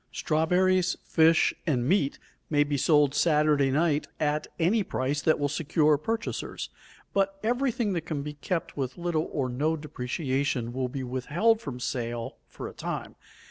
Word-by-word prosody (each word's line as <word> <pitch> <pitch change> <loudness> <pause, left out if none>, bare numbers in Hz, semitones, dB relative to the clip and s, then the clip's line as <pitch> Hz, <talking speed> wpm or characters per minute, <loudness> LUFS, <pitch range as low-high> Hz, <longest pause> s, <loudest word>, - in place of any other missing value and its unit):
Strawberries, 180 +3 +2
fish, 160 0 +4
and 125 -5 +1
meat 150 -5 +2 0.3
may 145 -1 +4
be 145 0 -2
sold 145 0 +4
Saturday 150 -4 +3
night 150 +1 +1
at 150 0 0
any 185 +7 +3
price 145 -5 -1
that 155 - +3
will 145 - 0
secure 155 +1 +2
purchasers, 225 +10 -3 0.4
but 195 0 +1
every 245 +4 +1
thing 215 -3 -1
that 170 -3 -3
can 145 -3 -2
be 150 0 -5
kept 165 +3 -3
with 130 -3 -3
little 170 -2 -1
or 135 -3 -1
no 150 +6 0
depreciation 135 -3 -2
will 130 0 -1
be 135 +1 -4
withheld 150 - +1
from 125 -3 -6
sale 120 -2 -3
for - - -7
a - - -9
time. - - -5
150 Hz, 160 wpm, -27 LUFS, 135-170 Hz, 0.4 s, fish